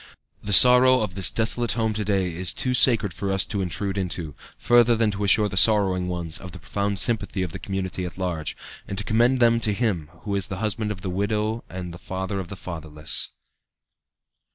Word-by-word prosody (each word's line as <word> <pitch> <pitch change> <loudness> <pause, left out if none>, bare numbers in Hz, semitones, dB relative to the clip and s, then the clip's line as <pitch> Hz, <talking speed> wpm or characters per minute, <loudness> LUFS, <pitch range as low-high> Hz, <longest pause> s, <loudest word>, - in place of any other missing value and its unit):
The 105 - -5
sorrow 125 +4 +7
of 105 -4 -3
this 95 0 +2
desolate 115 +1 0
home 110 -2 -1
to 105 0 -2
day 95 -3 0
is 90 +1 -3
too 125 - -1
sacred 115 -7 +3
for 100 +3 -3
us 95 0 +1
to 100 - -3
intrude 95 +2 -2
into, 85 -4 -4 0.2
further 120 -1 +4
than 110 -2 +1
to 100 0 -4
assure 105 +1 +4
the 95 - -5
sorrowing 95 -3 +4
ones 85 -3 -2
of 95 -1 -10
the - - -8
profound 100 +3 -3
sympathy 100 -4 0
of 90 - -5
the - - -7
community 95 -2 -4
at 90 - -7
large, 85 -4 -3 0.3
and 100 - -5
to 105 - -2
commend 120 +5 +2
them 115 -1 +4
to 110 -2 +1
Him 100 -10 -1
who 105 - -4
is 100 -3 0
the 95 - -5
husband 105 +1 -2
of 95 -3 -7
the 95 - -4
widow 105 +4 -1
and 90 -2 -7
the 85 - -10
father 95 +2 -4
of 95 - -6
the 100 - -8
fatherless. 80 -4 -3
100 Hz, 210 wpm, -24 LUFS, 90-110 Hz, 0.3 s, sorrow